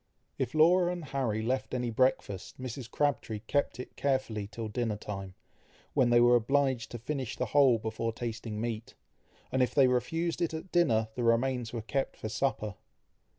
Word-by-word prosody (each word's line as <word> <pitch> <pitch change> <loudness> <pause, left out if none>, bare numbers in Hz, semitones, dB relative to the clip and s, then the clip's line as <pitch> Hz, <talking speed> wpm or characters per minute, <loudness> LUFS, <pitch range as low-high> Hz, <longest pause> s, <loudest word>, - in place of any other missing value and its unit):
If 130 +1 -2
Laura 175 +3 +5
and 175 -3 -5
Harry 130 -6 -1
left 130 +2 -1
any 125 -1 -1
breakfast, 110 -6 0
Mrs. 130 -1 -6
Crabtree 115 -6 -1
kept 145 -3 0
it 125 - -8
carefully 130 -7 -1
till 110 +1 -5
dinner 110 0 -1
time, 95 -3 -6 0.6
when 125 -2 +3
they 120 0 +6
were 120 0 +6
obliged 130 0 +1
to 120 - -6
finish 130 0 -4
the - - 0
whole 135 -5 +6
before 110 +1 -2
tasting 115 -2 -5
meat; 115 -1 -4 0.6
and 130 - +2
if 125 - +1
they 140 - +7
refused 165 +8 0
it 165 -2 0
at 160 +4 -7
dinner, 115 -11 +3
the 125 - -4
remains 120 0 +1
were 115 -3 -4
kept 135 +4 -2
for 110 - -5
supper. 110 -2 -1
120 Hz, 175 wpm, -30 LUFS, 110-135 Hz, 0.6 s, they